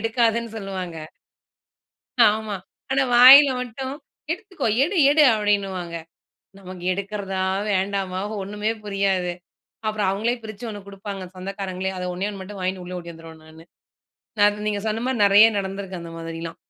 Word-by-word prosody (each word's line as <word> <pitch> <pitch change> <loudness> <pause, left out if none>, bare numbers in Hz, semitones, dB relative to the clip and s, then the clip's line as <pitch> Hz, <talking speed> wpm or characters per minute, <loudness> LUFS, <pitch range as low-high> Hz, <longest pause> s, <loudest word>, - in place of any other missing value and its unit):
எடுக்காதன்னு 230 0 0
சொல்லுவாங்க. 185 -4 -6 1.3
ஆமா. 210 -1 +1 0.4
ஆனா 270 0 +3
வாயில 270 +3 +10
மட்டும், 260 +2 -5 0.4
"எடுத்துக்கோ 365 - -3 0.2
எடு 365 +6 -1
எடு" 300 +1 +5
அப்டின்னுவாங்க. 195 -5 -1 0.6
நமக்கு 185 -2 -10
எடுக்கிறதா? 195 -1 -3 0.3
வேண்டாமா? 190 -1 -1 0.2
ஒண்ணுமே 210 +3 -2
புரியாது. 195 -3 0 0.6
அப்புறம் 215 -2 0
அவங்களே 220 +5 0
பிரிச்சு 220 +2 -8
ஒண்ணு 205 -2 -7
குடுப்பாங்க 195 -1 -7
சொந்தக்காரங்களே, 190 0 -4
அத 180 - -4
ஒண்ணே 185 +3 -2
1 200 - -8
மட்டும் 195 +1 -9
வாங்கின்னு 185 0 -2
உள்ள 180 0 -6
ஓடி 170 0 -9
வந்துருவேன் 160 -1 -13
நானு. 160 +1 -15 0.8
நான் 205 0 +3
நீங்க 205 -1 -1
சொன்ன 220 +1 -2
மாரி 260 -4 -1
நெறைய 205 +2 +8
நடந்திருக்கு 195 -1 -5
அந்த 170 - -9
மாதிரிலாம். 165 0 -6
200 Hz, 135 wpm, -23 LUFS, 185-220 Hz, 1.3 s, வாயில